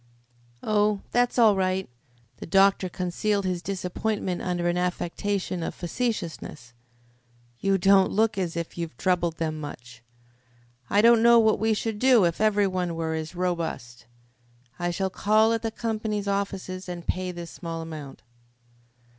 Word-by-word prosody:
"Oh, 210 -1 +1
that's 245 0 +1
all 220 -4 +6
right." 190 0 0 0.5
The - - -8
doctor 195 +1 +4
concealed 190 +3 -1
his 180 -2 -1
disappointment 190 0 -3
under 175 -1 -1
an 175 - +1
affectation 180 +1 -2
of - - -4
facetiousness. 175 - -4 0.9
"You 195 0 +2
don't 195 +1 +4
look 220 +1 +2
as 175 -4 -2
if 170 +1 -5
you 170 - -1
troubled 175 -3 0
them 155 -1 -2
much. 125 -5 -9 0.9
I 205 +1 +3
don't 235 -1 +6
know 235 0 +7
what 220 -1 +4
we 220 0 +2
should 215 0 -3
do 250 -6 +5
if 170 +3 -1
every 210 -2 +3
one 180 -3 -2
were 165 -1 -2
as 160 +2 -5
robust. 165 -10 -3 0.7
I 175 0 -1
shall 190 +2 -2
call 215 +4 +3
at 225 - -1
the 225 - -1
company's 215 -2 -3
offices 195 -2 -3
and 175 -1 -6
pay 185 0 -2
this 175 -1 -8
small 165 -2 -6
amount." 150 -8 -9
185 Hz, 150 wpm, -26 LUFS, 170-210 Hz, 0.9 s, know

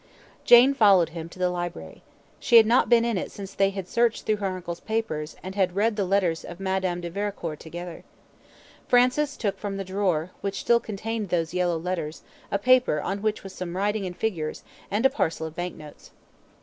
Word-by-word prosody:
Jane 245 +3 +8
followed 200 -9 +5
him 165 0 -7
to 170 - -14
the 180 -1 +1
library. 175 - -6 0.4
She 235 - +5
had 225 - +8
not 235 +4 +3
been 235 -1 +5
in 230 -5 0
it - - -5
since 195 -1 -8
they 195 0 +2
had 195 -2 -6
searched 235 +1 +1
through 215 - +1
her 200 -1 -2
uncle's 180 -2 -5
papers, 195 -9 -3
and 185 +1 -6
had 185 -2 0
read 215 +2 +2
the 200 -2 0
letters 180 -4 +1
of 175 - -9
Madame 190 -2 -1
de 170 - -5
Vericourt 195 -5 -4
together. 175 +1 -8 0.8
Francis 255 +4 +3
took 205 -4 -2
from 200 -1 -4
the 195 - -3
drawer, 185 -3 -1
which 200 0 -3
still 235 0 +4
contained 220 -1 -4
those 165 -2 -1
yellow 180 -2 +1
letters, 165 -2 -4 0.3
a - - +1
paper 250 -6 +3
on 195 +5 -3
which 215 0 -1
was 195 -1 -9
some 180 -1 -5
writing 205 0 0
and 180 - -8
figures, 170 -9 -3 0.3
and 210 +5 0
a - - +7
parcel 160 0 -1
of 160 0 -8
bank 175 0 -4
notes. 150 -1 -13
195 Hz, 200 wpm, -25 LUFS, 175-215 Hz, 0.8 s, Jane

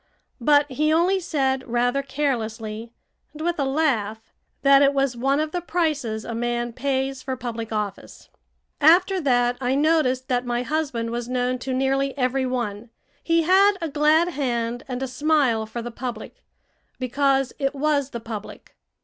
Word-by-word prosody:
But 290 +3 +4
he 305 +4 +1
only 350 +4 +3
said 270 -7 -1
rather 245 +3 +1
carelessly, 230 -5 -3 0.4
and 305 - -9
with 345 -1 -1
a 280 - +1
laugh, 265 -7 0 0.4
that 275 0 +6
it 280 0 +4
was 270 -2 +1
one 270 +4 +1
of 310 0 -1
the 355 - -2
prices 300 -11 -1
a 235 - -5
man 240 0 -2
pays 265 +1 -2
for 260 - -3
public 230 -2 -5
office. 210 -2 -5 0.5
After 360 +5 +5
that 245 -3 +2
I 255 +1 +1
noticed 280 -4 +2
that 245 -1 0
my 245 0 -1
husband 270 -6 -2
was 240 0 -4
known 250 0 -1
to 260 +2 -4
nearly 270 +1 0
every 260 0 0
one. 235 -3 -3 0.3
He 330 0 +2
had 385 +4 +5
a 330 -2 -3
glad 305 +4 +3
hand 245 -6 -2
and 255 0 -4
a - - -2
smile 255 -4 +1
for 235 +2 -6
the 240 - -6
public 235 -2 -7 0.5
because 270 +1 +1
it 275 0 -1
was 285 -1 +1
the 235 - -6
public. 220 -2 -9
265 Hz, 165 wpm, -23 LUFS, 240-295 Hz, 0.5 s, that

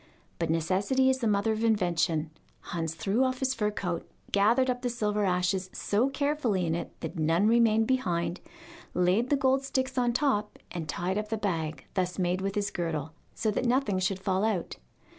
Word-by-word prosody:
But 165 -1 -1
necessity 195 +11 +2
is 260 - -1
the 235 - 0
mother 205 +1 +2
of 220 +1 -1
invention: 170 -7 +1 0.4
Hans 165 -2 -2
threw 215 +7 +1
off 255 0 0
his 265 0 0
fur 210 -4 0
coat, 180 -5 -4 0.2
gathered 230 +6 +4
up 250 -1 -1
the 245 - -1
silver 210 -3 0
ashes 185 0 0
so 225 +6 +1
carefully 275 - 0
in 160 - 0
it 170 - -5
that 175 - -5
none 165 +6 +3
remained 225 -1 +4
behind, 180 -9 0 0.6
laid 185 +7 +2
the 285 - +3
gold 265 0 +2
sticks 260 -1 -1
on 245 -1 +2
top, 235 -5 0
and 160 -4 -5
tied 185 +6 -1
up 210 0 -5
the 220 - -1
bag 160 -8 -2
thus 180 -1 -1
made 180 0 0
with 195 +1 -2
his 205 -1 -1
girdle, 160 -3 -3 0.2
so 220 - 0
that 210 - -1
nothing 240 -6 +2
should 185 +1 0
fall 190 0 0
out. 215 -6 -1
205 Hz, 190 wpm, -29 LUFS, 180-240 Hz, 0.6 s, gathered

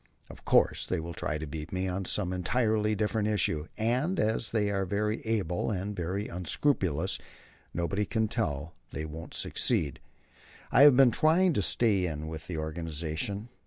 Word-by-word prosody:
Of - - -14
course - - +3
they - - 0
will 85 +1 -5
try 75 - -2
to 80 - -5
beat 75 +2 -6
me 95 0 -1
on 95 +1 -2
some 90 +1 0
entirely 110 +4 +1
different 105 0 0
issue, 85 -7 0
and, 130 +12 0
as 110 +1 0
they 105 -3 +1
are 95 -1 0
very 105 +3 -1
able 100 -6 0
and 100 0 -3
very 95 +4 -2
unscrupulous, 90 - 0 0.5
nobody 95 +5 -1
can 110 -1 +1
tell 80 - -2 0.2
that - - -13
they 75 - -3
won't 80 +1 -8
succeed.... 70 -3 0 0.7
I 130 - +6
have 125 - +2
been 135 -3 +7
trying 165 +7 +4
to 105 - +1
stay 100 -2 +2
in 80 -1 -4
with 80 0 -7
the 85 - -4
organization. 80 +6 -3
95 Hz, 170 wpm, -29 LUFS, 80-110 Hz, 0.7 s, been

